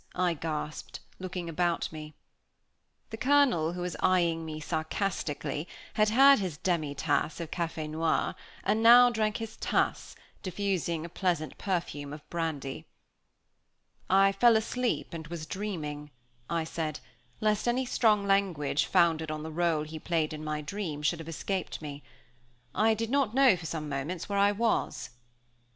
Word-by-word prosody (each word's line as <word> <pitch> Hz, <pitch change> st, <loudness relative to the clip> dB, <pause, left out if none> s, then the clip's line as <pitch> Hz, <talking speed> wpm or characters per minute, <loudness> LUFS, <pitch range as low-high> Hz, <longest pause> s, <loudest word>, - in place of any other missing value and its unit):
I 180 Hz, -1 st, +2 dB
gasped, 155 Hz, -1 st, -5 dB, 0.2 s
looking 185 Hz, -2 st, -5 dB
about 170 Hz, +1 st, 0 dB
me. 155 Hz, -1 st, -9 dB, 1.0 s
The 220 Hz, -, -5 dB
Colonel, 250 Hz, -, +3 dB
who 180 Hz, -, -5 dB
was 180 Hz, 0 st, -3 dB
eyeing 170 Hz, -3 st, +2 dB
me 155 Hz, -1 st, -5 dB
sarcastically, 155 Hz, -2 st, -2 dB, 0.3 s
had 215 Hz, 0 st, +3 dB
had 270 Hz, +4 st, +7 dB
his 180 Hz, -7 st, -3 dB
demitasse 150 Hz, -3 st, 0 dB
of 165 Hz, -2 st, -6 dB
café 165 Hz, -3 st, -3 dB
noir, 160 Hz, +1 st, 0 dB, 0.3 s
and 215 Hz, +3 st, +1 dB
now 245 Hz, +2 st, +8 dB
drank 215 Hz, -2 st, 0 dB
his 225 Hz, -1 st, -7 dB
tasse, -, -, -1 dB, 0.3 s
diffusing 185 Hz, -4 st, -2 dB
a -, -, -7 dB
pleasant 170 Hz, -4 st, -1 dB
perfume 165 Hz, -7 st, -3 dB
of 150 Hz, 0 st, -11 dB
brandy. 160 Hz, -5 st, -3 dB, 1.2 s
"I 195 Hz, +1 st, +5 dB
fell 225 Hz, +3 st, +5 dB
asleep 240 Hz, -1 st, -2 dB
and 160 Hz, -1 st, -6 dB
was 165 Hz, -1 st, -6 dB
dreaming," 155 Hz, -7 st, -5 dB, 0.4 s
I 170 Hz, -1 st, 0 dB
said, 160 Hz, -2 st, -4 dB, 0.4 s
lest 215 Hz, +1 st, +1 dB
any 250 Hz, +2 st, +1 dB
strong 215 Hz, -4 st, +3 dB
language, 180 Hz, -7 st, +1 dB
founded 165 Hz, -3 st, +3 dB
on 155 Hz, 0 st, -4 dB
the 160 Hz, -, -6 dB
rôle 165 Hz, -2 st, +1 dB
he 155 Hz, +1 st, -7 dB
played 160 Hz, -2 st, -1 dB
in 155 Hz, 0 st, -6 dB
my 150 Hz, 0 st, -2 dB
dream, 155 Hz, -2 st, -4 dB
should 165 Hz, +2 st, +1 dB
have 165 Hz, 0 st, -7 dB
escaped 185 Hz, +3 st, -3 dB
me. 145 Hz, -2 st, -7 dB, 0.7 s
"I 220 Hz, +1 st, +3 dB
did 225 Hz, +1 st, -3 dB
not 270 Hz, -5 st, +1 dB
know 265 Hz, -6 st, +6 dB
for 165 Hz, -2 st, -7 dB
some 155 Hz, -2 st, -4 dB
moments 145 Hz, +5 st, -4 dB
where 200 Hz, -1 st, 0 dB
I 200 Hz, +1 st, +5 dB
was." 225 Hz, -, -1 dB
170 Hz, 150 wpm, -29 LUFS, 155-205 Hz, 1.2 s, now